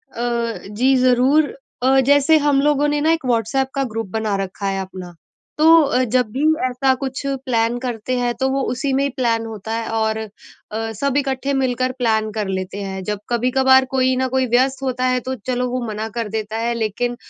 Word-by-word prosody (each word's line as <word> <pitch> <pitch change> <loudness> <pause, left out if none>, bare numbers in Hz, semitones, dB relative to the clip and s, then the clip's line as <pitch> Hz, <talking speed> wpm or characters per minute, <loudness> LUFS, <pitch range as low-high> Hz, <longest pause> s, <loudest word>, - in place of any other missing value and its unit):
अ, 235 -1 -2
जी। 250 +6 +2
ज़रूर 255 +4 +3 0.3
अ, 265 +1 +4
जैसे 285 +3 +5
हम 285 -2 +3
लोगों 295 0 +2
ने 295 0 0
ना 315 +2 +3
एक 325 -4 -3
व्हाट्सएप 245 +2 +1
का 275 - +1
ग्रुप 225 -2 -3
बना 220 -1 -1
रखा 195 +1 -5
है 195 0 -1
अपना, 185 -2 -8 0.4
तो 320 +1 +7
अ, 255 -3 +1
जब 250 0 +1
भी 275 +5 -2 0.3
ऐसा 260 +1 +2
कुछ 265 +1 -4 0.2
प्लान 235 -1 +1
करते 245 0 -3
हैं, 245 -1 0
तो 265 +3 0
वो 270 +1 0
उसी 270 +2 -2
में 275 +1 +2
ही 280 - +1
प्लान 230 -3 +1
होता 220 -1 -7
है 230 0 -3
और 220 0 -1 0.4
अ, 225 +1 -3
सब 280 +5 -1
इकट्ठे 270 -1 -1
मिलकर 255 -1 0
प्लान 220 -3 +1
कर 210 -2 -3
लेते 190 +1 -4
हैं। 190 -1 -5
जब 210 +1 -3
कभी-कभार 260 +2 +4
कोई 260 -1 +2
न 260 0 +1
कोई 260 0 +1
व्यस्त 265 +2 +2
होता 255 -1 -1
है, 255 0 +2
तो 260 +2 -4
चलो 250 0 0
वो 255 +1 -2
मना 215 +1 -4
कर 230 -2 -2
देता 220 0 -4
है, 235 +1 -1
लेकिन 235 +2 -2
250 Hz, 205 wpm, -20 LUFS, 220-265 Hz, 0.4 s, तो